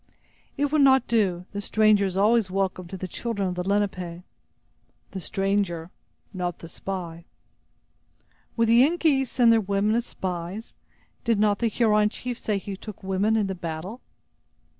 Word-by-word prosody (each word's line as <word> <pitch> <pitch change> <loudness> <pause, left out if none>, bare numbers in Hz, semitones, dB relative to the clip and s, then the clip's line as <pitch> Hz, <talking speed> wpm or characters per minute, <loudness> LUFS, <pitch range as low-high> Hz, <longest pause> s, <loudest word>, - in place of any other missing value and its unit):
"It 285 0 0
would 305 -1 +3
not 265 -1 +5
do. 190 -6 +1
The 205 - -4
stranger 215 -1 +3
is 190 -1 -3
always 215 0 +3
welcome 185 -1 -2
to 190 - -7
the 185 - -5
children 205 -1 -2
of - - -3
the 180 0 -3
Lenape." 185 -4 -1 0.9
"The 190 - -5
stranger, 195 -3 -1 0.4
but - - -9
not 175 -1 -2
the 165 - -10
spy." 170 -2 -6 1.3
"Would 230 -1 +3
the 235 +1 +6
Yengeese 290 -4 +2
send 235 -2 +4
their 225 - +4
women 200 +1 +1
as 235 +1 0
spies? 185 +4 -5 0.5
Did 230 -3 +2
not 205 -1 +2
the 235 - +2
Huron 210 -2 +3
chief 245 +2 -5
say 210 -2 -1
he 195 0 -6
took 205 0 -10
women 195 +3 +1
in 210 - +1
the 195 - -3
battle?" 175 +6 -6
200 Hz, 165 wpm, -25 LUFS, 185-230 Hz, 1.3 s, the